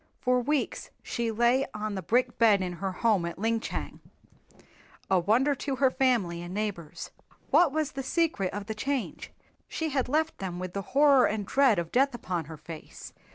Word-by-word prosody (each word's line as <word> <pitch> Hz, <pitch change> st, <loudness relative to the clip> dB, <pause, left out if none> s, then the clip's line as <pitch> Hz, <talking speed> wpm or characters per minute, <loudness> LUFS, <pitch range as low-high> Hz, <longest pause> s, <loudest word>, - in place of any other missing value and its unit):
For 250 Hz, -1 st, +2 dB
weeks 290 Hz, +3 st, -1 dB
she 235 Hz, -1 st, -2 dB
lay 240 Hz, +4 st, +2 dB
on 210 Hz, 0 st, -3 dB
the 190 Hz, -, -3 dB
brick 240 Hz, +7 st, 0 dB
bed 210 Hz, -4 st, +5 dB
in 180 Hz, -1 st, -3 dB
her 190 Hz, +2 st, -3 dB
home 205 Hz, -1 st, +1 dB
at 170 Hz, 0 st, -4 dB
Linchang, 225 Hz, +3 st, -2 dB, 1.1 s
a 190 Hz, -, +5 dB
wonder 235 Hz, +11 st, +3 dB
to 275 Hz, 0 st, -3 dB
her 265 Hz, 0 st, +3 dB
family 225 Hz, -12 st, +1 dB
and 175 Hz, +2 st, -7 dB
neighbors. 200 Hz, -7 st, -4 dB, 0.4 s
What 345 Hz, -5 st, +5 dB
was 310 Hz, 0 st, -1 dB
the 270 Hz, -, -4 dB
secret 265 Hz, -, 0 dB
of 205 Hz, 0 st, -5 dB
the 220 Hz, -, -4 dB
change? 270 Hz, +3 st, -3 dB, 0.4 s
She 320 Hz, -1 st, -3 dB
had 265 Hz, -3 st, -1 dB
left 315 Hz, +3 st, 0 dB
them 185 Hz, -2 st, -4 dB
with 185 Hz, 0 st, -5 dB
the 200 Hz, -, -2 dB, 0.2 s
horror 280 Hz, -3 st, +6 dB
and 210 Hz, -1 st, -2 dB
dread 265 Hz, -1 st, +3 dB
of 170 Hz, -1 st, -3 dB
death 270 Hz, +1 st, +2 dB
upon 180 Hz, -8 st, -3 dB
her 160 Hz, +1 st, -9 dB
face. 155 Hz, +1 st, -10 dB
225 Hz, 185 wpm, -28 LUFS, 185-270 Hz, 1.1 s, horror